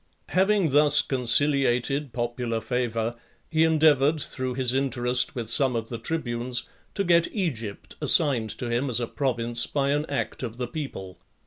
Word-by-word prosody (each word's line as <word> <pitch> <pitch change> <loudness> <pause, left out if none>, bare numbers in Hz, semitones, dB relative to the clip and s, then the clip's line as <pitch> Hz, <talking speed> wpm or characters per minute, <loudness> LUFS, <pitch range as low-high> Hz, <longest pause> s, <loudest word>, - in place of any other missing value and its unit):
XI. - - -12
Having 195 -2 +2
thus 145 +1 +4
conciliated 135 +1 +2
popular 120 -1 -3
favour, 115 0 -2 0.4
he 160 0 +3
endeavoured, 155 -2 +3
through 130 -3 -4
his 130 -1 0
interest 125 -2 0
with 120 -3 -4
some 125 +2 +2
of 115 -1 -4
the 115 - -6
tribunes, 120 -4 -2 0.3
to 200 - 0
get 170 -2 +2
Egypt 120 - -5
assigned 125 -8 +4
to 120 - -4
him 120 +4 -1
as 120 - +1
a 120 - -1
province, 120 -2 0
by 140 -1 -1
an 150 +2 -1
act 140 - -3
of 120 -2 -6
the 125 -1 -3
people. 120 - -7
130 Hz, 160 wpm, -25 LUFS, 120-145 Hz, 0.4 s, thus